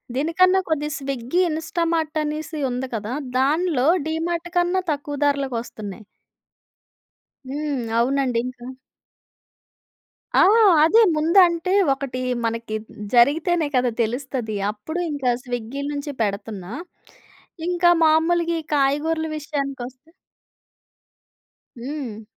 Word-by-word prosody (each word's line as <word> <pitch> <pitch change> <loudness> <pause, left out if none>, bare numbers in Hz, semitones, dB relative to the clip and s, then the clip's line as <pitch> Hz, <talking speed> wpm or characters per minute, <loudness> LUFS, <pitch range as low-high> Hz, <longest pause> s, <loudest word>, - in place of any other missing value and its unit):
దీనికన్నా 365 +6 +3
కొద్ది 300 -1 0
Swiggy, 275 +3 -1
Instamart 320 0 -1
అనేసి 305 +1 -4
ఉంది 255 +1 -3
కదా 220 +2 -4 0.2
దానిలో 290 0 +2 0.2
డీమార్ట్ 335 +2 -2
కన్నా 355 +2 +2
తక్కువ 290 0 -4
ధరలకి 280 -3 0
వస్తున్నాయి. 215 -2 -9 1.5
హ్మ్. 290 -1 -2 0.2
అవునండి. 255 -1 +1
ఇంక 255 0 -7 1.8
ఆ! - - +7 0.4
అదే 395 +9 +6
ముందంటే, 340 +2 +4 0.2
ఒకటీ 270 -2 -5 0.3
మనకీ 230 -1 -3
హ్మ్, - - -25 0.3
జరిగితేనే 310 +7 +3
కదా 250 -1 +3
తెలుస్తది. 240 -1 -3 0.2
అప్పుడు 315 +12 -6
ఇంక 285 -3 -5 0.2
స్విగ్గీ 245 +2 -5
నుంచి 290 0 -4
పెడతన్నా. 200 -2 -3 1.0
ఇంక 355 0 -2 0.2
మాములుగీ 330 +1 +3
కాయగూరల 295 +3 +1
విషయానికొస్తే 275 -2 -5 1.7
హ్మ్. 250 -5 -6
285 Hz, 95 wpm, -22 LUFS, 250-325 Hz, 1.8 s, ఆ